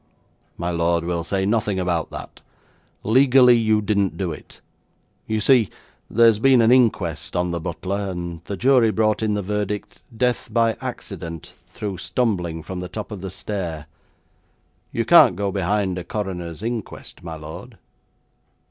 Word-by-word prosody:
'My 85 +1 -2
lord, 85 0 +1
we'll 85 -1 -2
say 95 +3 -1
nothing 105 -2 0
about 85 -3 -1
that. - - -9 0.6
Legally 125 +1 +6
you 110 -2 +2
didn't 100 -2 0
do 95 -4 -2
it. 75 - -11 0.7
You 110 0 0
see, 115 -2 +4 0.4
there's 115 -1 +5
been 130 +1 +5
an 115 0 +5
inquest 105 -13 +2
on 90 0 0
the 85 - -2
butler 95 +4 -3
and 85 -2 -6
the 100 - -5
jury 125 -1 +4
brought 110 0 +1
in 110 -1 0
the 105 - -2
verdict, 105 +1 -3 0.2
"Death 125 0 0
by 115 -1 +2
accident, 85 -2 -7
through 100 -4 -6
stumbling 90 -9 -1
from 90 +3 -6
the 90 0 -6
top 110 0 -6
of 100 -4 -6
the 95 - -5
stair." 90 -5 -5 1.1
You - - -1
can't 90 - +7
go 100 +1 -1
behind 95 0 0
a - - -6
coroner's 90 -2 -5
inquest, 115 -2 -6
my 80 -1 -7
lord.' 80 0 -10
100 Hz, 155 wpm, -22 LUFS, 85-110 Hz, 1.1 s, can't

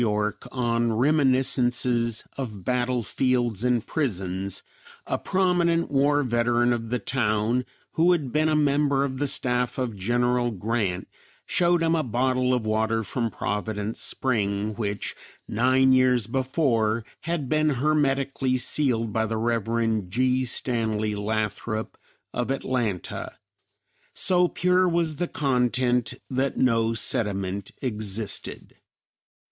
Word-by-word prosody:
Y., 105 -1 +1 0.2
on 120 -2 0
"Reminiscences 125 -3 +2
of 105 -9 -6
Battle 125 -1 0
fields 120 -2 0
and 125 -3 +1
Prisons," 95 - -2 0.4
a - - -2
prominent 175 -3 +1
war 145 +1 +3
veteran 120 0 +2
of 115 -1 -4
the 125 - 0
town, 115 0 0 0.3
who 170 +2 +3
had 150 -8 0
been 155 +3 +2
a 155 - +2
member 140 -2 +2
of 130 -1 -5
the 145 - 0
staff 125 -2 0
of 125 -4 -2
General 120 +4 +1
Grant, 105 -3 -2 0.4
showed 175 -1 +2
him 165 0 +2
a 165 - +2
bottle 130 0 0
of 125 -3 0
water 110 +1 0
from 115 +1 -2
Providence 105 +1 -3
Spring 105 -4 0
which 100 -1 -4 0.3
nine 130 +3 +3
years 125 -3 +3
before 120 -3 0
had 165 -4 -3
been 155 +2 +2
hermetically 135 -2 +1
sealed 125 -4 +2
by 110 0 0
the 110 +1 -2
Rev. 115 -2 0
G. 130 +4 +1
Stanley 110 -3 -1
Lathrop 110 +1 -3 0.4
of 125 0 -2
Atlanta. 120 -8 -2 0.8
So 180 -1 +3
pure 180 +1 +2
was 165 -3 0
the 175 - -1
content 125 -3 0
that 130 +1 -1
no 115 -2 +2
sediment 100 -3 -1
existed. 110 -3 -3
120 Hz, 120 wpm, -25 LUFS, 110-135 Hz, 0.8 s, war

